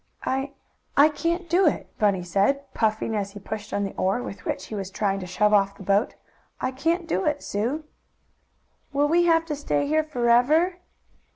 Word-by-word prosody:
"I 270 +1 -1 0.4
I 290 +2 +7
can't 340 +3 -2
do 350 +2 +4
it," 300 - 0
Bunny 200 -4 +2
said, 200 +11 0
puffing, 220 0 0
as 200 -1 -3
he 205 - -8
pushed 210 +1 -6
on 205 - -1
the 195 - -4
oar, 195 +6 0
with 195 - -8
which - - -3
he - - -9
was 195 -3 -4
trying 195 0 -1
to 185 - -6
shove 210 +4 +2
off 200 -1 +3
the - - -10
boat. 200 +3 +1 0.4
"I 255 - -1
can't 330 +7 0
do 190 - 0
it, 295 -1 0
Sue." 240 +10 -2 1.1
"Will 285 +1 +3
we 345 +3 +3
have 330 -1 +3
to 305 -2 -3
stay 285 0 -1
here 310 +2 +2
forever?" 300 +6 +2
245 Hz, 190 wpm, -25 LUFS, 200-310 Hz, 1.1 s, I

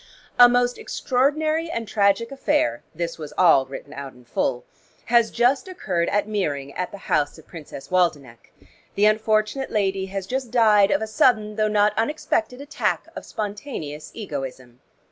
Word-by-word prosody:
"A 245 0 +10
most 245 0 +1
extraordinary 310 +5 0
and 230 -8 -4
tragic 205 +3 +2
affair" 120 - 0
(this 170 0 -4
was 150 -1 -7
all 160 -7 +5
written 140 +2 -9
out 140 -1 -7
in 125 -1 -19
full) 125 +1 -2 0.4
"has 235 -1 +4
just 250 +7 +1
occurred 185 - -2
at 205 0 0
Meering 145 -10 -2
at 180 - -3
the 200 - -9
house 145 -1 0
of - - -15
Princess 155 -5 -10
Waldenech. 145 -10 -1 0.4
The 205 - +3
unfortunate 215 +4 +1
lady 195 -2 0
has 195 0 -5
just 255 +3 -3
died 215 -4 +5
of 195 +2 +1
a - - -1
sudden 215 -1 +2
though 215 0 +1
not 210 0 +3
unexpected 250 -1 -1
attack 290 +1 -2
of - - -8
spontaneous 200 - -6
egoism. 135 - -7
210 Hz, 160 wpm, -23 LUFS, 155-235 Hz, 0.4 s, A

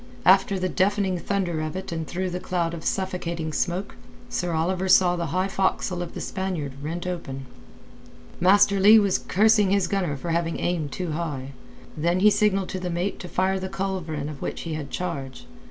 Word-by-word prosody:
After 195 +1 +5
the 185 0 0
deafening 190 -1 +1
thunder 175 -4 -1
of 155 +2 -4
it 190 -1 -5
and 160 -2 -3
through 185 +1 -3
the 180 - -3
cloud 170 -2 -1
of 165 -2 -6
suffocating 170 -4 -2
smoke, 180 +5 -2 0.3
Sir 180 -6 -2
Oliver 180 +4 0
saw 180 -1 +6
the 170 -1 -2
high 185 +5 0
forecastle 190 -2 0
of 175 - -6
the - - -5
Spaniard 185 -7 -3
rent 165 +4 -4
open. 135 -7 -5 0.9
Master 200 +2 +5
Leigh 210 +3 +8
was 200 -3 +3
cursing 210 0 +3
his 200 -1 +3
gunner 175 -7 -1
for 165 +5 -4
having 165 0 -1
aimed 160 -5 -1
too 180 +1 -3
high. 150 -5 -4 0.4
Then 170 +4 +1
he 210 +1 +7
signalled 200 -2 +2
to 185 - -4
the 180 -1 -3
mate 175 +3 -2
to 180 - -7
fire 190 +2 +1
the 190 0 -4
culverin 185 -7 -3
of 150 -2 -8
which - - -4
he 165 - -4
had 150 -3 -5
charge. 135 - -5
180 Hz, 190 wpm, -25 LUFS, 165-190 Hz, 0.9 s, Leigh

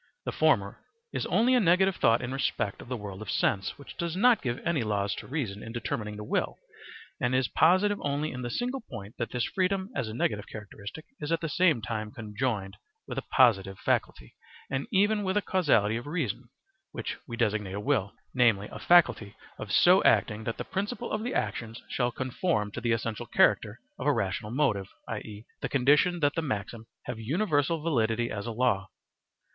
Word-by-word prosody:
The - - -1
former - - +2 0.3
is - - -2
only 245 +3 +3
a 250 - +5
negative 190 -1 +4
thought 115 +2 +3
in 125 +2 -3
respect 115 -6 -1
of - - -12
the 125 0 -3
world 100 -2 -7
of 110 - -7
sense, 95 -1 0
which 140 - -11
does 170 -1 -2
not 235 +3 +5
give 120 -2 -2
any 170 -4 +1
laws 100 -2 0
to - - -7
reason 115 -9 -3
in 115 - -7
determining 115 -2 -3
the 105 - -6
will - - -1 0.6
and 125 +1 +1
is 130 -2 +2
positive 190 +5 +3
only 145 +2 -1
in 125 - -6
this 120 -1 -3
single 250 +2 -2
point 115 - -9
that 120 - -1
this 125 -1 -1
freedom 190 +2 -1
as 130 - -1
a 110 - -6
negative 105 -3 -1
characteristic 110 +6 -9
is 150 - -4
at 165 - +2
the 165 - -3
same 155 -8 +3
time 110 -1 -3
conjoined 110 -3 -3 0.3
with - - -3
a - - -8
(positive) 95 -6 +4
faculty 65 -8 -1 0.4
and 135 0 -2
even 205 +2 +3
with 190 0 0
a - - +3
causality 115 - +2
of 120 - -7
reason, 130 - -3 0.4
which - - -4
we 115 - -6
designate 105 -4 0
a - - -3
will, 100 -1 0 0.2
namely 115 -5 +3
a - - -7
faculty 155 -12 +4 0.2
of - - -6
so - - +6
acting 110 +1 +3
that 115 - -3
the - - -4
principle 210 +5 -3
of 215 - -1
the 245 +3 -3
actions 115 +1 -2
shall 125 -1 0
conform 130 - -1
to - - -6
the 120 -1 0
essential 115 -1 -2
character - - +3 0.2
of - - -2
a - - +6
rational 105 - -2
motive, 115 -7 +1 0.2
i.e., 105 +1 -6 0.2
the - - -2
condition 145 +6 +3
that 145 0 +3
the 165 - -1
maxim 110 -4 -4 0.2
have 115 - -5
universal 150 - 0
validity 120 -6 +1
as 100 +2 -4
a - - -2
law. 110 -5 +1
125 Hz, 195 wpm, -28 LUFS, 110-165 Hz, 0.6 s, so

